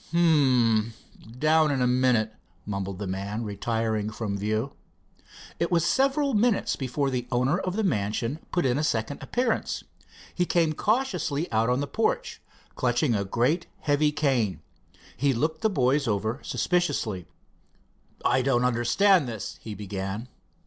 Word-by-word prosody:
"Hm. 125 -10 +3 0.4
Down 155 +2 +4
in 140 -2 0
a 125 - +2
minute," 125 -3 +2 0.3
mumbled 100 -2 -4
the 100 - -4
man, 100 +4 -3
retiring 110 0 -1
from 105 -2 -4
view. 110 +6 -2 0.9
It 170 - 0
was 170 -2 +3
several 275 - +2
minutes 225 0 +2
before 135 +1 -1
the 125 -1 -2
owner 130 +8 +2
of 185 -1 -3
the 220 - 0
mansion 115 - -1
put 175 - +1
in 130 +2 +2
a - - 0
second 120 -1 -1
appearance. 245 -2 -1 0.5
He 180 -1 0
came 165 -3 +2
cautiously 205 - 0
out 110 +2 +2
on 125 +2 +1
the - - 0
porch, - - -1 0.3
clutching 120 +1 +1
a 100 -2 0
great 125 - 0
heavy 150 0 +2
cane. 130 - 0 0.5
He 140 +1 +1
looked 160 +6 -1
the 220 - +3
boys 140 - +1
over 110 +4 -1
suspiciously. 115 - -1 1.0
"I 130 - +3
don't 125 -2 +2
understand 130 - +3
this," 110 -4 -6
he 110 -2 -7
began. 100 +3 -5
125 Hz, 145 wpm, -26 LUFS, 110-155 Hz, 1.0 s, Down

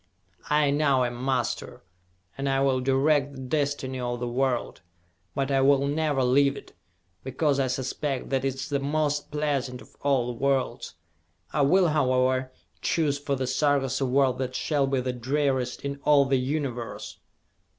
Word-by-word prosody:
I 150 -1 +3
now 140 -3 +2
am 120 0 -3
master, 130 -3 -2 0.5
and 135 +1 -3 0.2
will 130 -1 +2
direct 140 +2 +2
the 130 - -9
destiny 135 -1 -2
of 120 -1 -3
the 120 - -3
world! 125 0 -1 0.5
But 135 -1 -1
I 135 0 +3
will 140 0 +4
never 145 -2 0
leave 140 +2 +3
it, - - -12 0.5
because 140 +2 0
I 135 - +2
suspect 130 +2 -3
that 135 -1 +1
it 135 -1 -1
is 140 +2 -6
the 140 -1 0
most 145 +1 -1
pleasant 140 -4 -2
of - - -16
all 135 -4 +2
the 120 -1 -5
worlds! 135 -8 -1 0.6
I 150 - +1
will, 175 +5 +4
however, 130 -2 +1 0.3
choose 150 -4 0
for 140 -1 -1
the 130 -1 -2
Sarkas 135 0 +1
a 135 - +1
world 130 0 +2
that 130 -1 -3
shall 145 -3 0
be 135 -1 0
the 125 0 -2
dreariest 130 0 -1
in 140 0 -4
all 145 -2 +5
the 135 -1 +2
Universe!" 130 -3 -4
135 Hz, 165 wpm, -26 LUFS, 130-145 Hz, 0.6 s, all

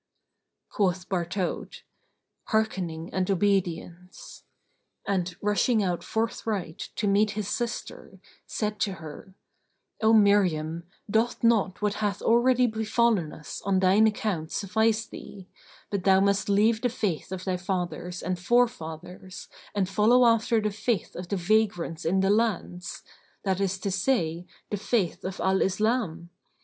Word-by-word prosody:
Quoth 185 -3 0
Bartaut, 180 0 -3 0.6
"Hearkening 180 -7 -1
and 185 0 0
obedience"; 180 -2 -2 0.6
and, 180 -3 -1
rushing 210 +2 +2
out 180 -2 -1
forthright 220 -6 -3
to 210 - -1
meet 205 +2 +3
his 210 -2 -2
sister, 240 +1 -5 0.3
said 210 -1 -3
to 205 -2 0
her, 165 +2 -10 0.7
"O 220 0 +4
Miriam, 180 -7 +3 0.2
doth 225 +4 0
not 210 -4 +2
what 205 -1 +2
hath 205 -1 0
already 250 +2 +4
befallen 220 -6 +1
us 150 - -8
on 195 -1 +2
thine 195 +4 +5
account 200 -7 -2
suffice 220 +2 +1
thee, 190 -2 -11 0.4
but 200 -3 -2
thou 190 -1 +5
must 200 0 +1
leave 215 +3 +3
the 245 - +1
faith 205 -9 -3
of 185 -1 -5
thy 185 -1 -1
fathers 180 -1 -4
and 185 -1 -2
forefathers 185 -4 -1 0.3
and 195 -2 +1
follow 220 +6 +4
after 230 0 +3
the 210 0 -1
faith 210 -1 -2
of 180 0 -6
the 200 - 0
Vagrants 180 -3 0
in 190 +4 +2
the 195 +1 +3
lands, 205 -5 -1 0.4
that 190 -1 0
is 195 -1 0
to 195 +1 -3
say, 180 -5 0 0.2
the 205 - -1
faith 195 -3 -1
of 185 0 -5
Al 190 0 +2
Islam? 195 -4 0
195 Hz, 135 wpm, -27 LUFS, 180-220 Hz, 0.7 s, thine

